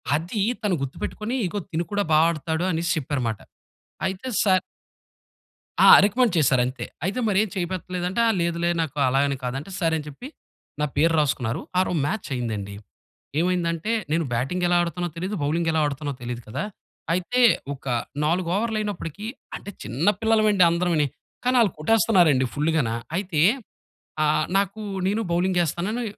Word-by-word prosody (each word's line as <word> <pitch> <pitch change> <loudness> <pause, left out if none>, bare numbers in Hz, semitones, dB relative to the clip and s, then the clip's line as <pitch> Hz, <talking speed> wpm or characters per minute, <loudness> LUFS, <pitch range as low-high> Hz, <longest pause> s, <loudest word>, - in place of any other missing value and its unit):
అది 175 +7 -2 0.2
తను 200 -4 +2
గుర్తుపెట్టుకొని,"ఇదిగో 210 - -3
తిను 170 +1 -1
కూడా 205 0 +1
బాగా 155 +1 +6
ఆడుతాడు" 160 +2 -2
అనేసి 165 0 -1
చెప్పారనమాట. 125 -7 -2 0.7
అయితే 190 +6 -4 0.2
సార్ 185 -3 +4 1.2
ఆ! - - +8 0.2
రికమెండ్ 215 +1 +2
చేసారంతే. 130 -4 +2 0.2
అయితే 200 +7 -1
మరి 200 -3 +1
ఏం 220 - -4
చేయిపెట్టలేదంటే, 180 +1 -3
ఆ! - - +4
లేదులే 170 0 0
నాకు 150 -3 -4
అలా 130 +1 +2
అని 140 -1 -2
కాదు 125 0 -2
అంటే 155 +8 -10
సరే, 165 -3 +1
అని 150 - -6
చెప్పి 150 - -9 0.5
నా - - +3
పేరు 165 +3 +4
రాసుకున్నారు. 125 -6 0 0.2
ఆ - - +5
రోజు 175 - 0
మ్యాచయిందండి. 120 - -3 0.6
ఏమైందంటే 175 +2 0 0.2
నేను 165 0 +1
బ్యాటింగెలా 175 +9 0
ఆడుతునో 175 +1 -2
తెలియదు, 185 +5 -3
బౌలింగెలా 160 +2 +1
ఆడుతునో 145 0 -3
తెలియదు 120 0 -5
కదా! 110 - -3 0.5
అయితే, 185 +8 0 0.3
ఒక 135 - -13 0.4
4 170 +3 +1
ఓవర్లు 225 +1 0
అయినప్పటికీ 205 -2 -5 0.3
అంటే 205 - -8
చిన్న 130 - -2
పిల్లలమండి 215 -3 +4
అందరంవుని. 170 -3 +1 0.4
కానీ 250 +1 +2
ఆళ్ళు 220 -5 +4
కొట్టేస్తున్నారు 195 0 +4
అండి 130 0 +1
ఫుల్లుగాన. 150 -4 +1 0.3
అయితే 180 -6 -1 0.8
ఆ! - - +4 0.3
నాకు 200 +2 -1 0.3
నేను 210 +4 +1
బౌలింగేస్తానని 180 - 0
170 Hz, 140 wpm, -24 LUFS, 150-195 Hz, 1.2 s, ఆ